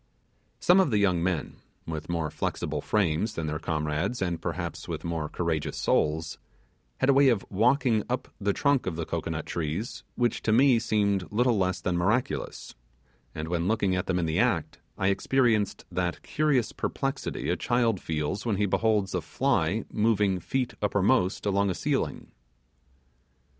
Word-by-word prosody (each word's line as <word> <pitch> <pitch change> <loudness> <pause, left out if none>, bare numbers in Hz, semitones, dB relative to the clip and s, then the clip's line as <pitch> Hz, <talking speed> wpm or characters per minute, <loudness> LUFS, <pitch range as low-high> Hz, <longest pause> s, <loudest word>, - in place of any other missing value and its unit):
Some 180 +2 +5
of 190 - +4
the 110 - +2
young 95 -4 +2
men, 85 -3 -2 0.3
with 80 -1 -5
more 80 -3 -1
flexible - - -3
frames 105 +1 0
than 80 - -3
their 75 0 -2
comrades, 80 +9 -1
and 90 -3 -2
perhaps - - -4
with - - -4
more 80 -3 -3
courageous 80 -3 -2
souls, 80 +1 0 0.6
had 130 - +1
a - - +7
way 135 0 +6
of 115 -6 +1
walking 120 +2 +3
up 125 - -2
the 100 -1 +1
trunk 140 +3 +1
of 90 - -2
the 85 0 -3
cocoanut - - -3
trees 85 +7 -3
which 120 -1 0
to 110 - 0
me 125 +1 +5
seemed 100 -4 0
little 120 +2 +2
less 95 -2 0
than 85 0 0
miraculous; 105 +8 -1 0.6
and 80 +1 -4
when 85 +1 -1
looking 100 -3 +1
at 90 - -2
them 95 - +1
in 85 - 0
the 80 +2 0
act, 110 -10 0 0.2
I 95 0 +2
experienced 110 0 +1
that 90 -1 -2
curious 145 -6 +1
perplexity - - -3
a - - +2
child 115 -5 +1
feels 80 +5 -2
when 115 -4 0
he 105 +1 +1
beholds 105 -1 +1
a - - 0
fly - - 0
moving 105 -3 +2
feet 125 +9 -2
uppermost 100 0 +2
along 100 0 +2
a 90 - -1
ceiling. - - -2
100 Hz, 165 wpm, -27 LUFS, 85-115 Hz, 0.6 s, a